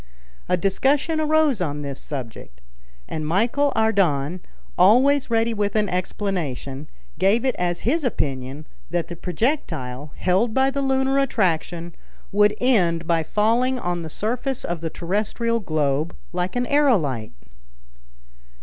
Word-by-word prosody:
A 180 - +3
discussion 275 - +1
arose 310 -7 +2
on 145 -3 -2
this 140 -1 -5
subject, 115 - -7 0.5
and 155 -1 -4
Michel 235 - +2
Ardan, 185 -8 +1 0.4
always 255 +10 +4
ready 230 0 +2
with 205 -1 -1
an 210 -1 +2
explanation, 165 -7 -3 0.3
gave 200 +7 +3
it 260 - +2
as 175 -1 -1
his 305 +7 +1
opinion 140 - -3 0.2
that 175 -1 -2
the 175 - -5
projectile, 160 - -2
held 195 +5 +1
by 265 0 +3
the 280 +1 -2
lunar 270 0 +2
attraction, 175 -8 0 0.4
would 210 +1 +4
end 175 -10 +2
by 165 0 +2
falling 230 +9 +1
on 175 -6 -2
the 160 - -6
surface 245 - -2
of 170 -1 -3
the 165 - -2
terrestrial 215 +7 -1
globe 155 -4 -1 0.2
like 180 +3 -2
an 245 0 +1
aerolite. 190 - +1
195 Hz, 130 wpm, -23 LUFS, 160-245 Hz, 0.5 s, always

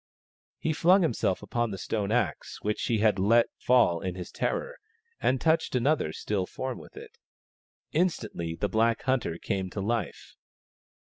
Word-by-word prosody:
He 155 - -1
flung 180 +5 +5
himself 115 - 0
upon 120 -1 -1
the 95 - -5
stone 105 0 -2
axe, 110 - -1
which 105 0 -1
he 115 - +1
had 105 -2 +3
let 115 +5 +4
fall 120 -9 +3
in 95 -2 -3
his 90 -2 -7
terror, - - -2 0.4
and 130 - +1
touched 160 -2 +1
another 125 - +2
still 95 +2 -2
form 130 -1 -5
with - - -14
it. - - -12 0.7
Instantly 150 - -1
the 105 - -1
black 110 +3 +1
hunter 125 -11 0
came 95 0 -2
to 100 - -6
life. 115 +3 -3
115 Hz, 155 wpm, -28 LUFS, 95-130 Hz, 0.7 s, flung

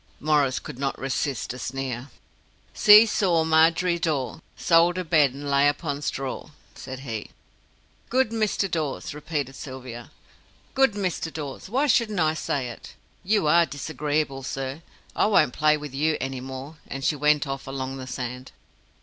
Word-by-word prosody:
Maurice 145 -3 +2
could 135 -4 -7
not 135 -1 -1
resist 135 -2 -2
a 125 - -9
sneer. 130 +1 -4 0.6
"See 210 +2 +8
saw, 180 -7 +2
Margery 165 +2 +3
Daw, 155 -4 -1 0.2
Sold 170 +1 +4
her 185 - -1
bed, 155 -5 +4
and 145 +1 -7
lay 140 0 +4
upon 145 0 -1
straw!" 135 -2 -4 0.2
said 130 0 -8
he. 115 -6 -5 0.8
"Good 255 -2 +2
Mr. 215 -3 0
Dawes!" 160 -2 -3
repeated 145 -3 -4
Sylvia. 125 -3 -8 0.6
"Good 270 -4 +4
Mr. 185 -5 -2
Dawes! 150 +2 -7
Why 265 +7 +1
shouldn't 230 -8 +2
I 155 -1 +3
say 140 -5 -2
it? 120 - -11 0.3
You 205 -2 +2
are 170 +2 +5
disagreeable, 145 -1 -2
sir. 135 +3 -4 0.3
I - - +3
won't 155 -11 +3
play 150 0 +3
with 150 -2 -8
you 155 +3 +1
any 135 -1 -3
more," 135 +4 -8
and 135 0 -6
she - - +2
went 150 +1 +3
off 135 -1 -5
along 135 0 -4
the 130 -1 -7
sand. 125 0 -6
145 Hz, 160 wpm, -25 LUFS, 135-165 Hz, 0.8 s, See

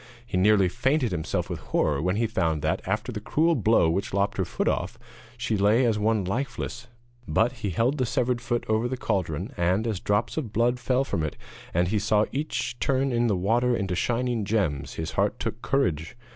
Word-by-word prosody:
He 120 - -5
nearly 100 +1 +4
fainted 125 - +1
himself 80 -3 -2
with - - -5
horror 75 -2 0
when 90 +3 0
he 115 +2 +1
found 80 -8 0
that, - - 0
after 105 +5 -1
the 110 - -4
cruel 160 +9 +2
blow 110 - +3
which 100 +7 -1
lopped 100 0 0
her - - +1
foot - - -2
off, - - -1 0.4
she 120 -2 -1
lay 105 +5 +4
as 110 -3 +1
one 105 -2 +1
lifeless; 120 +2 -3 0.4
but 115 +2 +2
he 115 -5 -4
held 120 - +1
the 130 - +2
severed 125 0 0
foot 120 0 -1
over 110 +2 +1
the 130 +1 -3
cauldron, 95 - -2
and, 90 +5 +1
as 110 -5 -1
drops 105 +9 0
of 130 -9 -3
blood 120 +3 +1
fell 130 +1 +1
from 110 - -2
it, 75 -1 -3 0.4
and 85 +1 +1
he 105 +1 +1
saw 105 +1 +2
each 120 -4 -3
turn 135 0 +1
in 120 0 +2
the 100 -4 +1
water 120 +6 +2
into 95 -3 -2
shining 120 +3 0
gems, 85 -10 -1
his 80 - -4
heart - - 0
took 115 - -4
courage. 85 - 0
110 Hz, 205 wpm, -26 LUFS, 95-120 Hz, 0.4 s, nearly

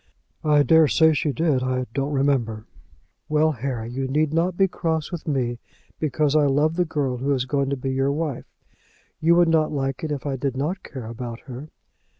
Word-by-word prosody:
"I 150 -1 +4
daresay 160 +2 +5
she 145 +1 0
did. 150 -3 +1
I 130 0 -1
don't 140 +1 -1
remember." 130 -6 0 0.6
"Well, 155 +1 +3
Harry; 120 -3 -4
you 135 +2 -2
need 150 +3 +1
not 175 +2 +1
be 195 - +4
cross 160 -3 -2
with 175 -2 -6
me 125 -5 -1 0.4
because 150 -1 +1
I 150 -2 +4
love 150 +4 +2
the 180 0 +1
girl 140 -6 -1
who 135 +3 -1
is 130 -1 -1
going 140 0 0
to 140 - -1
be 130 +1 -3
your 135 +1 +1
wife. 150 -3 -3 0.7
You 165 +2 +4
would 175 0 +5
not 160 -1 +2
like 135 -2 -2
it 155 - -2
if 140 -4 -4
I 135 -2 -2
did 130 0 -2
not 170 +8 -2
care 130 -4 -8
about 115 0 -6
her." 135 +3 -9
140 Hz, 195 wpm, -23 LUFS, 130-155 Hz, 0.7 s, daresay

